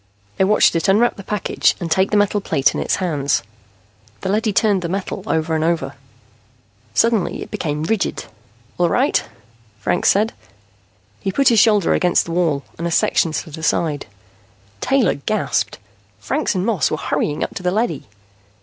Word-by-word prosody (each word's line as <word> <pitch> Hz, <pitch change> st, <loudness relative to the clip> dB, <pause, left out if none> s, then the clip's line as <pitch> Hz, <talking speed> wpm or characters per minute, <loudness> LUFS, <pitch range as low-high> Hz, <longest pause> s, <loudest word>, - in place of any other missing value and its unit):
They -, -, +3 dB
watched 210 Hz, -3 st, +4 dB
it 165 Hz, -, 0 dB
unwrap 215 Hz, +5 st, +3 dB
the 200 Hz, -, -10 dB
package 210 Hz, +1 st, 0 dB
and 170 Hz, -2 st, -5 dB
take 190 Hz, +2 st, +3 dB
the 210 Hz, -, +2 dB
metal 205 Hz, 0 st, +2 dB
plate 135 Hz, -8 st, +1 dB
in -, -, -2 dB
its -, -, 0 dB
hands. 150 Hz, -7 st, 0 dB, 0.8 s
The -, -, -3 dB
leady 215 Hz, +2 st, +1 dB
turned 205 Hz, -1 st, +2 dB
the 170 Hz, -, -3 dB
metal 195 Hz, +2 st, -3 dB
over 160 Hz, 0 st, 0 dB
and 155 Hz, 0 st, 0 dB
over. 165 Hz, 0 st, -1 dB, 1.0 s
Suddenly 225 Hz, -5 st, +1 dB
it -, -, -14 dB
became 150 Hz, -1 st, -3 dB
rigid. 215 Hz, +4 st, -1 dB, 0.5 s
"All -, -, +3 dB
right," -, -, +2 dB, 0.5 s
Franks 100 Hz, -, +1 dB
said. 215 Hz, +3 st, +2 dB, 0.9 s
He 195 Hz, -, -2 dB
put 275 Hz, +7 st, +3 dB
his 230 Hz, -2 st, +4 dB
shoulder 210 Hz, -5 st, +4 dB
against 180 Hz, -1 st, +2 dB
the 170 Hz, -, -6 dB
wall 165 Hz, -5 st, 0 dB, 0.2 s
and 170 Hz, -, -2 dB
a -, -, -3 dB
section 165 Hz, 0 st, +2 dB
slid 160 Hz, 0 st, -5 dB
aside. 155 Hz, -3 st, -1 dB, 0.7 s
Taylor 265 Hz, -7 st, +2 dB
gasped 140 Hz, -, -1 dB, 0.4 s
Franks 105 Hz, -, -1 dB
and 185 Hz, +1 st, 0 dB
Moss 220 Hz, -7 st, +1 dB
were 155 Hz, -, -2 dB
hurrying 150 Hz, -1 st, -1 dB
up -, -, -4 dB
to -, -, -6 dB
the 180 Hz, -, 0 dB
leady! 195 Hz, -, -1 dB
180 Hz, 170 wpm, -19 LUFS, 160-210 Hz, 1.0 s, watched